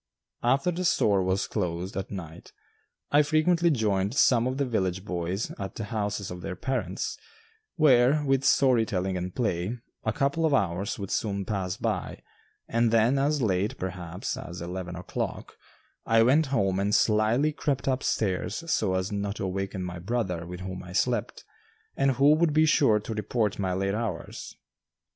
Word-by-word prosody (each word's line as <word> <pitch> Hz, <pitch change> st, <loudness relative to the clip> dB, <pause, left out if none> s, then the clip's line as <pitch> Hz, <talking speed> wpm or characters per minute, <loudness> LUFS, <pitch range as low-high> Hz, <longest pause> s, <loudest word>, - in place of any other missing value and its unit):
After 135 Hz, +8 st, +2 dB
the 180 Hz, +2 st, -3 dB
store 100 Hz, -, +3 dB
was 95 Hz, +1 st, 0 dB
closed 90 Hz, -2 st, -3 dB
at 95 Hz, 0 st, -4 dB
night, 85 Hz, -3 st, -9 dB, 0.6 s
I 145 Hz, -, +6 dB
frequently 160 Hz, +3 st, +3 dB
joined 105 Hz, -5 st, 0 dB
some 125 Hz, -3 st, +4 dB
of 130 Hz, +1 st, -2 dB
the 140 Hz, -, +1 dB
village 95 Hz, -5 st, -1 dB
boys 90 Hz, +2 st, -3 dB
at 95 Hz, -1 st, -5 dB
the 110 Hz, -, -4 dB
houses 105 Hz, -2 st, -3 dB
of 90 Hz, 0 st, -7 dB
their 90 Hz, -, -5 dB
parents, 130 Hz, +8 st, -3 dB, 0.6 s
where, 145 Hz, -1 st, +4 dB
with 135 Hz, -1 st, +2 dB
story 130 Hz, -4 st, +4 dB
telling 95 Hz, -3 st, -2 dB
and 90 Hz, 0 st, -4 dB
play, 105 Hz, -1 st, -1 dB, 0.3 s
a 110 Hz, -, 0 dB
couple 140 Hz, +8 st, 0 dB
of 155 Hz, -3 st, +3 dB
hours 100 Hz, -2 st, -1 dB
would 100 Hz, -2 st, -6 dB
soon 100 Hz, -2 st, -1 dB
pass 95 Hz, -3 st, -2 dB
by, -, -, -3 dB, 0.4 s
and 115 Hz, 0 st, +2 dB
then 115 Hz, +4 st, +3 dB
as 145 Hz, 0 st, +1 dB
late, 100 Hz, 0 st, 0 dB
perhaps, 90 Hz, -1 st, -4 dB
as 85 Hz, +1 st, -7 dB
eleven 90 Hz, 0 st, -5 dB
o'clock, 90 Hz, +1 st, -5 dB, 0.5 s
I 115 Hz, 0 st, +4 dB
went 140 Hz, +6 st, +4 dB
home 95 Hz, -8 st, +1 dB
and 100 Hz, +1 st, +1 dB
slyly 110 Hz, +7 st, +3 dB
crept 145 Hz, -3 st, -2 dB
up 130 Hz, -1 st, +1 dB
stairs 95 Hz, -5 st, -1 dB, 0.2 s
so 95 Hz, -4 st, +1 dB
as 95 Hz, +2 st, -1 dB
not 100 Hz, 0 st, -2 dB
to -, -, -5 dB
awaken 95 Hz, 0 st, -3 dB
my 90 Hz, -1 st, -5 dB
brother 90 Hz, -4 st, -2 dB
with 90 Hz, 0 st, -7 dB
whom 95 Hz, 0 st, -5 dB
I 90 Hz, -1 st, -10 dB
slept, 120 Hz, +2 st, -1 dB, 0.5 s
and 135 Hz, -1 st, +2 dB
who 140 Hz, +4 st, +5 dB
would 155 Hz, -1 st, +2 dB
be 155 Hz, +1 st, +5 dB
sure 135 Hz, -8 st, +4 dB
to 110 Hz, +2 st, -5 dB
report 105 Hz, 0 st, -1 dB
my 95 Hz, -2 st, 0 dB
late 95 Hz, +1 st, -1 dB
hours. 105 Hz, -6 st, -5 dB
105 Hz, 170 wpm, -27 LUFS, 95-130 Hz, 0.6 s, I